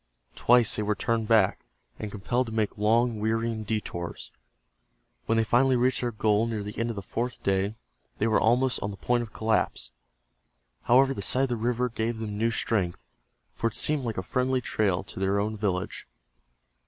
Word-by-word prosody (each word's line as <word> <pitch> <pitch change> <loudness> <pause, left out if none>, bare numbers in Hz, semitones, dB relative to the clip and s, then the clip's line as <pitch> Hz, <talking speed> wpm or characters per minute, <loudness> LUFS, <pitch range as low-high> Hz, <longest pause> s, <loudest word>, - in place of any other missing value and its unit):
Twice 120 -2 +4
they - - 0
were 105 0 0
turned 115 +1 -1
back, 110 -4 +3 0.4
and 105 - -4
compelled 120 +5 -1
to - - -6
make 110 -2 -1
long, 115 +2 +2
wearying 110 +1 -1
detours. 100 -5 -4 1.0
When 115 - +2
they 115 - +4
finally 125 +4 +3
reached 125 +1 +2
their 120 -1 -1
goal 105 0 +1
near 110 -3 -3
the 105 +1 -7
end 115 +1 0
of 115 - -3
the 100 - -6
fourth 120 +6 -4
day, 100 +2 0 0.4
they - - 0
were 110 -1 +3
almost 125 +2 +3
on 100 - -2
the 100 - -7
point 120 +4 +1
of 115 -2 -7
collapse. 110 - 0 0.9
However, 135 +3 +5
the 115 - -5
sight 130 +7 +2
of 135 - 0
the 120 - 0
river 120 +2 0
gave 115 0 -2
them 110 -2 -5
new 115 +3 +1
strength, 100 -6 -1 0.5
for 115 - -1
it 115 - -4
seemed 150 -3 +2
like 115 -3 -3
a 95 - -2
friendly 130 +5 0
trail 100 -6 0
to - - -8
their 95 +1 +1
own 105 +2 -1
village. 95 -3 -3
110 Hz, 190 wpm, -27 LUFS, 105-120 Hz, 1.0 s, However